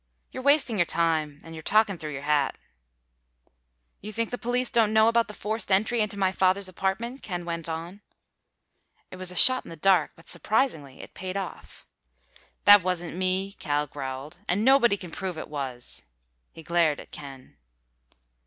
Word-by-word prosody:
"You're 260 - -6
wasting 280 -5 +3
your 175 - +3
time. 160 -3 0
And 165 - -11
you're 160 - -8
talking 205 0 +2
through 155 -1 -6
your 140 0 -6
hat." 145 -1 +1 1.4
"You 210 - -7
think 230 +1 -2
the 245 - -3
police 245 +1 -1
don't 225 -3 +3
know 220 0 +5
about 230 0 +3
the 210 - -9
forced 215 0 -3
entry 220 +4 +2
into 205 -1 -2
my 190 -1 +2
father's 190 +1 +1
apartment?" 195 +8 -3
Ken 175 -4 -5
went 170 -1 -4
on. 170 +5 -6 1.1
It 185 - -9
was 185 -1 -3
a 180 - -4
shot 255 +8 +6
in - - -13
the 165 - -8
dark, 190 +3 +3
but 165 - -19
surprisingly 160 - -1
it - - -12
paid 185 +1 -5
off. 195 -3 -8 0.8
"That 205 -1 +9
wasn't 175 -2 -3
me," 185 +2 -1
Cal 150 -3 0
growled, 135 +3 -7
"and 205 +5 0
nobody 260 -6 +5
can 180 -3 -10
prove 185 -2 -5
it - - -7
was!" 135 - -5 0.5
He 165 - -13
glared 165 -2 +1
at - - -12
Ken. 135 -3 -11
185 Hz, 175 wpm, -26 LUFS, 160-215 Hz, 1.4 s, That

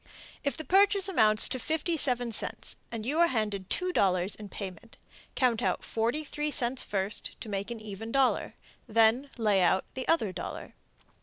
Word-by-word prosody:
If 280 +1 -1
the 315 - -5
purchase 395 0 +4
amounts 215 - +4
to 255 - -2
57 280 -5 +2
cents, 220 - -1 0.2
and 225 -2 -5
you 295 +6 -1
are 340 - +6
handed 210 - -2
$2.00 195 - +1
in 210 -1 -9
payment, 195 +3 -9 0.4
count 245 -4 +1
out - - -1
43 295 +6 -2
cents 250 -2 +2
first 195 0 -2
to - - -7
make 200 0 -4
an 235 -1 -6
even 215 +1 -7
dollar. 270 0 +1 0.3
Then 230 +5 +3
layout 195 -4 +2
the 260 - -6
other 275 - +2
dollar. - - -7
230 Hz, 155 wpm, -29 LUFS, 210-285 Hz, 0.4 s, are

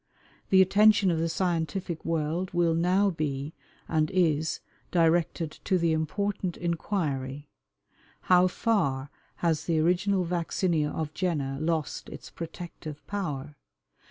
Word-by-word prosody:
The 190 -1 +7
attention 205 0 +5
of 165 - 0
the 165 +1 0
scientific 170 0 -2
world 165 +3 -1
will 170 -1 +3
now 185 +4 +3
be, 150 -2 -3 0.3
and 155 -1 +1
is, 160 -5 +1 0.3
directed 165 -1 +2
to 190 - +3
the 170 -2 +2
important 185 +3 -2
inquiry, 150 -6 -2 0.7
How 180 0 +5
far 145 - 0 0.3
has 160 -2 +1
the 165 -2 +1
original 180 +3 +2
vaccinia 170 -2 0
of 155 -1 -4
Jenner 145 -7 -1
lost 160 -2 -2
its - - -10
protective 165 -2 -8
power? 150 -8 -4
165 Hz, 120 wpm, -28 LUFS, 155-185 Hz, 0.7 s, The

